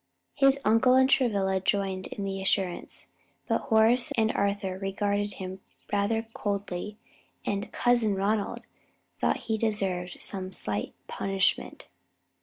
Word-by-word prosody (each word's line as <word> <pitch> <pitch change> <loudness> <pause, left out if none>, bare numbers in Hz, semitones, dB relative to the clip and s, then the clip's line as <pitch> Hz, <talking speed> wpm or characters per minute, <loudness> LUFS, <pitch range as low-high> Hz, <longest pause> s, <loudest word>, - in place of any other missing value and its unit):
His 275 -1 +4
uncle 225 +4 +5
and 260 0 +6
Travilla 200 -8 +2
joined 190 -1 0
in 200 - -5
the 195 0 -3
assurance, 190 -2 -1 0.4
but - - +1
Horace 235 +4 +4
and 220 0 +3
Arthur 200 -2 -1
regarded 205 +1 -1
him 190 0 -6 0.3
rather 205 +3 +1
coldly, 200 0 -3 0.5
and 200 +2 -2
"Cousin 240 -4 +2
Ronald" 200 +2 0 0.6
thought - - +1
he 220 -1 0
deserved 195 -5 -1
some 185 -1 -5
slight 105 -8 -3
punishment. 195 -1 -1
200 Hz, 120 wpm, -28 LUFS, 190-220 Hz, 0.6 s, and